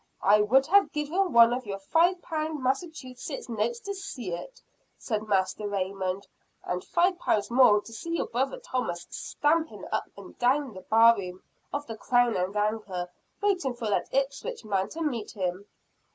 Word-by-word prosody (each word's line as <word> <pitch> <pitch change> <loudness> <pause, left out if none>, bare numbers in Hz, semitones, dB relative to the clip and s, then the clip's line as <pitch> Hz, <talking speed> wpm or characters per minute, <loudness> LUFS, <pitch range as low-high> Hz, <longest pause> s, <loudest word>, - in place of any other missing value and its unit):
"I 210 +2 +6
would 260 +6 +4
have 395 +5 +4
given 325 +5 0
one 235 0 +7
of 250 -2 -4
your 195 -1 -3
five 335 - +2
pound 310 -3 -3
Massachusetts 260 -2 -3
notes 235 +1 -1
to 400 - -4
see 285 - -6
it," - - -7 0.4
said 215 -2 -3
Master 195 +1 0
Raymond. 195 -1 -2 0.4
"And 180 +1 -3
five 355 +1 +1
pounds 215 -6 0
more 235 -5 +6
to 230 - -12
see 335 +9 -3
your - - 0
brother 265 - -1
Thomas 250 - -3
stamping 320 +2 -1
up - - -1
and - - -11
down 260 +1 +2
the 185 - -9
bar 230 +4 +6
room 185 -3 -7 0.3
of 290 0 -3
the 225 - -6
'Crown 245 0 +2
and 185 +3 -1
Anchor,' 205 -4 -2 0.3
waiting 360 -11 +1
for 225 -3 -3
that - - 0
Ipswich 275 - -2
man 195 -1 0
to 330 +1 -4
meet 240 -9 -2
him." 185 0 -3
235 Hz, 170 wpm, -28 LUFS, 205-300 Hz, 0.4 s, one